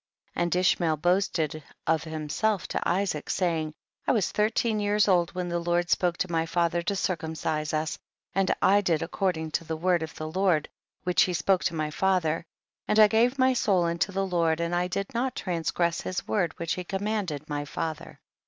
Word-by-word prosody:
42. - - -2
And 175 0 +1
Ishmael 175 -3 +2
boasted 160 -3 0 0.2
of 160 0 +1
him 155 -1 -5
self 200 +6 0
to - - -2
Isaac, 180 -5 -1
saying, 165 -4 0 0.4
I - - +4
was 215 -7 +1
thirteen 215 +1 +1
years 205 0 +2
old 175 -3 +2
when 180 -1 -2
the 170 0 -1
Lord 175 0 0
spoke 175 -2 +2
to 185 - -2
my 165 0 0
father 170 0 +1
to 200 +4 -1
circumcise 160 -4 -2
us, 155 0 -2 0.3
and 195 0 +1
I 200 +1 +5
did 165 -5 +1
according 165 -2 -1
to 165 - -1
the 160 0 -4
word 175 +1 +2
of 160 -1 -6
the 155 - -5
Lord 175 -2 +1 0.3
which 180 -2 +3
he 180 - +2
spoke 185 +3 +2
to 170 - 0
my 155 -1 -2
father, 170 -2 +1 0.4
and - - +2
T 215 -1 +9
gave 240 +4 +3
my 260 0 +4
soul 195 -7 +2
unto 170 +3 0
the 195 0 -1
Lord, 170 -3 +1
and 170 +1 -1
I 175 +1 +1
did 195 +2 -3
not 250 +2 -1
transgress 170 -1 -1
his 185 +1 -4
word 180 -6 0
whick 170 0 -3
he 180 - -1
commanded 190 -6 -3
my 145 -1 -2
father. 160 +2 -3
THE 150 - -13
BOOK - - -12
OF - - -15
JASHER. - - -32
175 Hz, 210 wpm, -27 LUFS, 160-195 Hz, 0.4 s, T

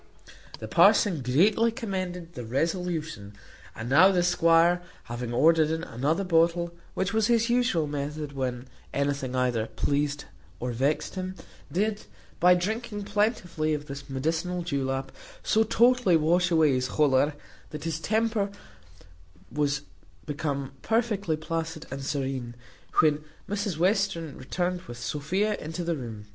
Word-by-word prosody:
The - - -7
parson 180 -9 +4
greatly 200 - +3
commended 185 -7 -4
this 125 -7 -7
resolution: 155 - -2 0.4
and 110 - -6
now 165 +9 +6
the 180 -2 +2
squire 170 0 +4 0.2
having 120 0 -5
ordered 155 +5 +4
in 160 +1 -2
another 150 +11 -1
bottle, 170 -1 +2 0.2
which 190 +2 -1
was 220 -1 +2
his 235 0 +2
usual 240 -10 +2
method 145 +1 -4
when 130 -2 -3 0.3
anything 140 -2 -1
either 125 -3 +1
pleased 145 0 -1 0.3
or 125 0 -2
vexed 135 +6 0
him, 185 0 -4 0.4
did, 210 +3 -1 0.3
by 180 +1 +6
drinking 210 +3 -3
plentifully 200 -7 0
of 145 0 -6
this 140 0 -8
medicinal 165 +6 -1
julap, 135 -4 -2 0.3
so 220 - +3
totally 235 -4 +4
wash 175 +3 +2
away 160 -4 +4
his 130 0 0
choler, 145 0 +3 0.3
that 150 -1 -7
his 160 -1 -2
temper 220 +2 0 1.0
was 145 0 0 0.4
become 140 -2 -3
perfectly 210 -8 0
placid 160 0 -4
and 135 0 -5
serene, 135 -3 -3 0.5
when 150 -1 +2 0.2
Mrs 200 -4 -2
Western 175 -4 +1
returned 175 +6 -2
with 120 0 -8
Sophia 150 - -1
into 160 +3 -5
the 170 0 0
room. 115 -6 -7
160 Hz, 135 wpm, -27 LUFS, 140-185 Hz, 1.0 s, now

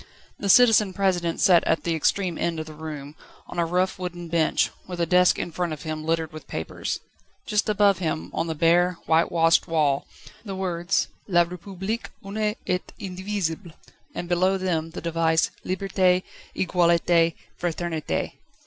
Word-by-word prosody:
The 200 - -2
Citizen 215 -3 +6
President 175 -3 0
sat 175 -3 +5
at 160 - +1
the 170 - 0
extreme 175 +3 +1
end 165 -2 -1
of 155 - -4
the 155 - -10
room, 150 -2 -7 0.3
on 175 - -6
a 170 - +1
rough 180 +2 0
wooden 175 -2 -5
bench, 160 -1 +2 0.2
with 180 -1 -6
a 170 - +2
desk 180 +2 +4
in 170 - -3
front 175 0 -2
of 150 - -8
him 155 -1 -4
littered 160 -1 -1
with 155 - -10
papers. 80 - -4 0.4
Just 210 +1 0
above 200 -3 +3
him, 160 -3 -3
on 165 - -1
the 160 - -2
bare, 175 +3 +3
whitewashed 165 +1 +3
wall, 150 -5 +1 0.4
the 195 -4 -5
words: 180 -1 0 0.2
"La 175 -3 +4
République: 190 +5 -5 0.2
une 210 +1 -1
et 180 0 -2
indivisible," 190 -3 -4 0.4
and 175 - -4
below 185 +2 +2
them 170 -4 -1
the - - -7
device: 165 -1 +1
"_Liberté, 185 -1 +1 0.3
Egalité, 170 -2 +3 0.3
Fraternité! 170 -2 -2
175 Hz, 160 wpm, -25 LUFS, 165-185 Hz, 0.4 s, Citizen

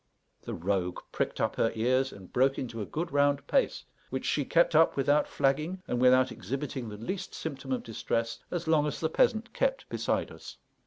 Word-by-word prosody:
The - - -5
rogue 90 0 -1
pricked - - -2
up - - 0
her 115 - +2
ears 130 +4 +2
and 95 -2 -13
broke 135 +2 +3
into 115 -3 -4
a 105 - -4
good 165 +1 -3
round 145 0 +2
pace, - - +1 0.2
which 130 0 -3
she 145 - +1
kept 170 +3 +3
up 160 +1 +5
without 145 +2 +3
flagging, 155 +7 0
and 125 - -1
without 130 0 +5
exhibiting 130 +2 -4
the 105 - -7
least 180 - -5
symptom 135 -4 -5
of 130 - -1
distress, 115 0 -2
as 175 -2 -3
long 155 -2 +3
as 150 - -3
the 160 - 0
peasant 225 +6 +2
kept - - 0
beside - - -1
us. - - -11
135 Hz, 195 wpm, -29 LUFS, 115-155 Hz, 0.2 s, up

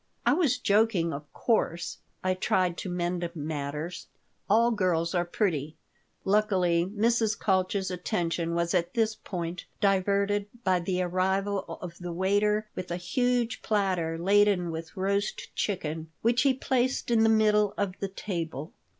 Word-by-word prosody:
"I - - +5
was 295 -6 +2
joking, 205 -7 +2
of 145 +1 -8
course," 175 -7 0 0.2
I 185 0 +2
tried 185 -1 +1
to 190 - -4
mend 175 0 -1
matters. 150 +3 -4 0.4
"All 230 +3 +5
girls 180 -5 +1
are 175 -1 +1
pretty." 160 -5 -1 0.5
Luckily 185 -4 +2
Mrs. 220 0 +2
Kalch's 190 -1 +1
attention 170 -1 -1
was 170 0 0
at 175 -1 0
this 225 -1 +2
point 175 -4 -5
diverted 200 +1 +2 0.2
by 185 -3 +3
the 180 +1 -1
arrival 190 +2 0 0.2
of 175 -1 -8
the 175 -1 -5
waiter 205 +4 +1
with 185 - -6
a 175 - -2
huge 245 +6 0
platter 185 -6 0
laden 195 -1 +3
with 160 +3 -7
roast 200 +2 -1
chicken, 160 -5 -2
which 235 +2 +3
he 270 -1 +3
placed 260 -1 0
in 230 -1 +4
the 225 - +5
middle 210 -2 +3
of 200 -2 -1
the 195 - -2
table. 165 -6 -5
185 Hz, 145 wpm, -28 LUFS, 170-210 Hz, 0.5 s, I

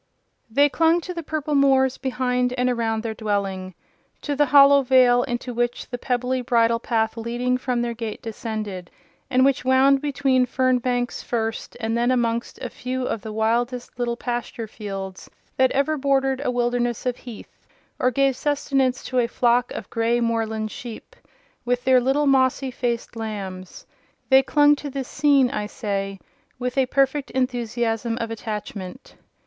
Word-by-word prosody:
They 285 +6 +4
clung 325 +3 +3
to 360 - -6
the 340 - -4
purple 310 -1 -3
moors 265 -2 +3
behind 250 -1 0
and 250 0 +1
around 225 -2 -1
their 225 -1 -3
dwelling—to 200 - -5
the 295 +1 +3
hollow 280 +1 +7
vale 250 -2 +5
into 240 +1 -4
which 240 +1 -2
the 245 - -4
pebbly 250 0 -1
bridle 230 -1 +2
path 225 -1 -1
leading 240 +2 -1
from 250 -2 -1
their 235 -1 -2
gate 225 -2 -5
descended, 215 -5 -5 0.4
and 260 0 +4
which 275 -2 +2
wound 265 +1 +4
between 270 -3 +1
fern 255 0 +2
banks 245 0 -2
first, 225 -1 -3
and 225 -1 -1
then 240 +1 +1
amongst 235 -2 0
a 250 - -3
few 255 0 -4
of 225 - -3
the 220 - -7
wildest 240 +3 -1
little 235 -1 -1
pasture 240 -2 -4
fields 195 -3 -7 0.3
that 260 0 +4
ever 280 +3 +1
bordered 270 -1 +1
a - - 0
wilderness 240 -1 -1
of 250 -1 -1
heath, 240 -4 -12 0.3
or 250 - +3
gave 270 +1 +2
sustenance 270 -2 0
to 255 - -1
a 235 - +2
flock 245 +1 +1
of - - -6
grey 230 +1 +1
moorland 220 -2 -1
sheep, 250 - -9 0.5
with 245 0 -1
their 255 -1 +5
little 270 +4 +1
mossy 265 -1 +2
faced 240 -1 -3
lambs:—they 210 +4 -2
clung 290 +2 +4
to 290 0 -7
this 270 -1 -5
scene, 275 -3 +3
I 210 -5 -3
say, 195 -3 -3 0.4
with 250 0 -3
a 265 -2 +2
perfect 275 +1 +1
enthusiasm 235 -2 -1
of 230 -1 -3
attachment. 210 -1 -6
245 Hz, 160 wpm, -23 LUFS, 230-265 Hz, 0.5 s, hollow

